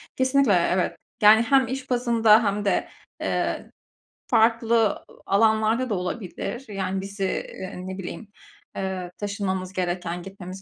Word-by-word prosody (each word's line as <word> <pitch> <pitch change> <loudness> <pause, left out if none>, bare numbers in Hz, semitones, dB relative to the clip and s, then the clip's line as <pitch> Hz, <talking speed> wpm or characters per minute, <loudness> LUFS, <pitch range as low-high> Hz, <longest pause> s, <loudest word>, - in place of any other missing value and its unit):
Kesinlikle, 260 -3 +3 0.2
evet, 185 -1 0 0.3
yani, 215 +1 +8
hem 265 +2 +3
iş 260 +2 -5
bazında 235 -3 +4
hem 205 0 -1
de, 195 - +1 0.3
eee, - - -2 0.6
farklı, 230 0 +3 0.3
ııı, - - -19
alanlarda 220 +4 +2
da 210 - 0
olabilir, 190 +6 -4
yani 190 -1 -2
bizi, 195 +1 -5
eee, 190 0 -4
ne 190 0 -5
bileyim, 195 +3 -7 0.5
eee, 190 -2 -4
taşınmamız 190 -3 -3
gereken, 180 -1 -3
gitmemiz 190 0 -9
205 Hz, 130 wpm, -24 LUFS, 190-230 Hz, 0.6 s, yani